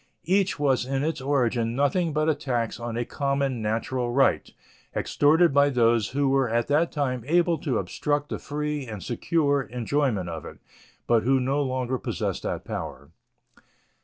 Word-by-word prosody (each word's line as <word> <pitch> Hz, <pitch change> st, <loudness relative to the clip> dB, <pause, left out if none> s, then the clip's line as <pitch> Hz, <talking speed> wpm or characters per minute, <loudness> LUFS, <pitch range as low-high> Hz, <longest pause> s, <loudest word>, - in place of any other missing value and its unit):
Each 190 Hz, 0 st, +2 dB
was 135 Hz, -4 st, +2 dB
in 135 Hz, +1 st, -1 dB
its 155 Hz, -2 st, -2 dB
origin 120 Hz, -4 st, 0 dB
nothing 145 Hz, +5 st, +1 dB
but 155 Hz, +1 st, 0 dB
a 160 Hz, -, +4 dB
tax 120 Hz, -7 st, -2 dB
on 120 Hz, -1 st, -4 dB
a 120 Hz, -, -1 dB
common 140 Hz, -3 st, -1 dB
natural 120 Hz, +3 st, -1 dB
right, 135 Hz, +2 st, +2 dB, 0.4 s
extorted 160 Hz, +2 st, +3 dB
by 140 Hz, +1 st, +5 dB
those 115 Hz, -5 st, +2 dB
who 140 Hz, +2 st, 0 dB
were 135 Hz, -2 st, +2 dB
at 115 Hz, +1 st, +1 dB
that 155 Hz, +4 st, +2 dB
time 130 Hz, -5 st, -2 dB
able 170 Hz, +1 st, +2 dB
to 130 Hz, -7 st, -1 dB
obstruct 145 Hz, +10 st, -2 dB
the -, -, -4 dB
free 150 Hz, -2 st, -3 dB
and 105 Hz, -4 st, -7 dB
secure 145 Hz, +3 st, +1 dB
enjoyment 125 Hz, -5 st, -1 dB
of 85 Hz, -1 st, -6 dB
it, -, -, -10 dB, 0.5 s
but 115 Hz, -2 st, +3 dB
who 130 Hz, +4 st, +2 dB
no 135 Hz, +3 st, 0 dB
longer 130 Hz, -1 st, -1 dB
possess -, -, -3 dB
that -, -, -4 dB
power. 70 Hz, +4 st, -6 dB
135 Hz, 165 wpm, -25 LUFS, 120-145 Hz, 0.5 s, by